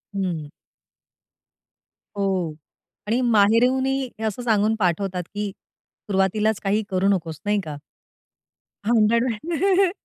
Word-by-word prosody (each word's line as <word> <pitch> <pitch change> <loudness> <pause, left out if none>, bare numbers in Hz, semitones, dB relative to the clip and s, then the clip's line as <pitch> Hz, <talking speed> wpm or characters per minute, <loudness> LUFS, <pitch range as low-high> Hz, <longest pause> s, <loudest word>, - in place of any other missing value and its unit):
हं. 170 -6 -2 1.7
हो. 190 -5 0 0.5
आणि 230 +3 +1
माहेरूनही 250 +4 +3 0.2
हे 225 - -5
असं 220 +3 -2
सांगून 220 -1 +2
पाठवतात 180 0 0
की 205 -1 -3
सुरुवातीलाच 205 +2 -2
काही 205 +2 +1
करू 190 0 +1
नकोस, 165 -6 0
नाही 205 0 +2
का? 155 -2 -6 1.1
भांडण 230 +1 +3
वगैरे 350 - +1
210 Hz, 100 wpm, -23 LUFS, 190-235 Hz, 1.7 s, माहेरूनही